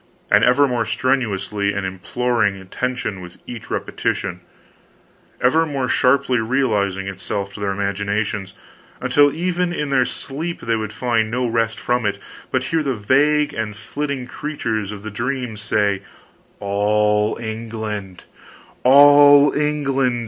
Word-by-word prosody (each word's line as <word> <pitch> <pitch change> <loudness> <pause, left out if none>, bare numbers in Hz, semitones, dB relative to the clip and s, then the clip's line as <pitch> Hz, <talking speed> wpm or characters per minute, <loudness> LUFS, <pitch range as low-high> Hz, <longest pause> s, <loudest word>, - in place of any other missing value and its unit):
_ - - +9
and - - +4
ever 140 +3 +5
more 120 -3 0
strenuously 105 -3 -1
imploring 100 +3 -1
attention 105 +2 -4
with 90 -1 -11
each 120 -2 -9
repetition, 90 - -2 1.0
ever 155 +6 +3
more 140 -5 -2
sharply 130 -1 +2
realizing 105 -6 0
itself 100 +1 -4
to - - -9
their 100 -1 -1
imaginations, 100 0 -2 0.4
until 145 0 +4
even 175 +2 -1
in 150 -5 -3
their 130 -2 +4
sleep 160 +8 -5
they 115 0 0
would 110 -1 -3
find 115 -1 0
no 125 +2 -1
rest 115 0 0
from 120 0 0
it, 105 -1 -1 0.3
but - - 0
hear 165 -1 0
the 135 -4 -1
vague 145 +7 +2
and 110 -2 -4
flitting 135 +4 -4
creatures 115 -8 -3
of 105 -1 -9
the 110 - -6
dreams 120 -1 -3
say, 100 -2 +1 0.6
All 105 +1 +1
England 110 -4 -5 0.6
ALL 145 +1 +7
ENGLAND! 140 -4 0
115 Hz, 135 wpm, -20 LUFS, 105-135 Hz, 1.0 s, _